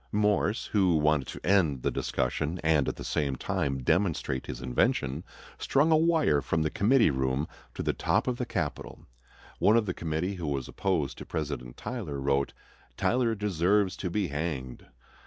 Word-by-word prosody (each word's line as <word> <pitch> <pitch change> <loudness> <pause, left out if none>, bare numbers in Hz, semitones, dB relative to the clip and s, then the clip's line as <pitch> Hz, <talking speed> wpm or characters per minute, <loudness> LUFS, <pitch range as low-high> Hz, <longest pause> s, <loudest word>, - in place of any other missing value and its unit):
Morse, 105 +1 +1
who 95 -6 +2
wanted 75 -3 +2
to - - -8
end 85 -9 +2
the - - +1
discussion 75 +7 -1
and 80 -3 +3
at - - -1
the - - -8
same 70 -3 -1
time 70 +1 -2
demonstrate 80 -5 0
his - - -5
invention, 65 +3 0 0.4
strung 145 +4 +2
a - - +7
wire 155 - +3
from 80 +2 0
the 80 - -1
committee 115 - +4
room 65 +2 0 0.3
to - - -3
the - - +1
top - - 0
of 125 -1 0
the 125 - -2
Capitol. - - -4 0.5
One 110 +3 +5
of 115 - +2
the 90 - -2
committee, 80 +4 -2
who 85 -3 -4
was 70 -3 -2
opposed 85 -8 -1
to - - -7
President 70 -6 -4
Tyler, 100 - -5
wrote, 70 0 +1 0.5
"Tyler 120 -2 +1
deserves 100 -1 +1
to 90 - -3
be 95 0 -1
hanged." 70 -4 -4
80 Hz, 175 wpm, -28 LUFS, 70-105 Hz, 0.5 s, a